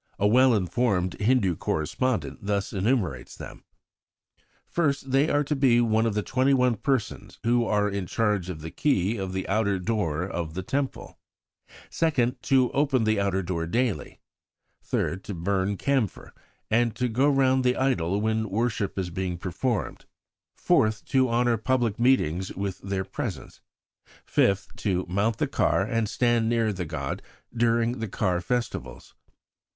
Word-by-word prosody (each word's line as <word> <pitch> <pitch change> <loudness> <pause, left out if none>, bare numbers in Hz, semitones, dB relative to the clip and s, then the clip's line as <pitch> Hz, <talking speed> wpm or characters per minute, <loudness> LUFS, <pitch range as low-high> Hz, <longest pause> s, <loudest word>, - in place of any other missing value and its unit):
A 100 - 0
well 125 +3 +5
informed 95 -1 0
Hindu 105 -6 +2
correspondent 115 - -2
thus 100 0 -2
enumerates 105 0 -1
them: - - -10 1.0
"First 140 -5 -1
they 140 +4 +3
are 145 - +2
to 150 +1 -1
be 130 -4 +4
one 110 -1 +2
of 110 - -2
the 105 - 0
twenty 130 +4 +2
one 125 -3 +2
persons 130 0 -2
who 120 0 +2
are 105 -1 +2
in 100 -3 -3
charge 105 -4 0
of 80 -4 -6
the 80 +1 -7
key 115 -6 +1
of 95 -2 -4
the 95 0 -3
outer 100 -1 +1
door 90 -5 -1
of 85 -4 -4
the 95 - -3
Temple; 135 +7 -3 0.7
second, 135 -7 0
to 130 -3 +3
open 135 -4 +2
the 110 -1 +2
outer 95 -1 0
door 85 -2 -3
daily; 115 -4 -1 0.6
third, 95 +2 -2
to 100 - -5
burn 95 +3 -1
camphor, 130 - -1 0.4
and 120 +1 +1
go 135 +5 +3
round 130 -2 +3
the 125 0 +2
idol 100 -8 +1
when 110 0 0
worship 105 -1 -1
is 90 -2 -2
being 90 -1 -3
performed; 100 +6 -3 0.5
fourth, 110 0 +1
to 130 -2 +2
honour 120 0 +2
public 120 -1 0
meetings 95 -8 +2
with 95 -1 -3
their 95 -1 -3
presence; - - -6 0.6
fifth, 100 0 +1
to 95 -3 -1
mount 100 +5 0
the - - +1
car - - +1
and 115 -2 -1
stand 120 -2 +1
near 115 -2 +1
the 90 -2 -4
god 75 -4 -4 0.3
during 115 0 +1
car 90 -3 0
festivals." 85 - -4
110 Hz, 150 wpm, -26 LUFS, 95-125 Hz, 1.0 s, well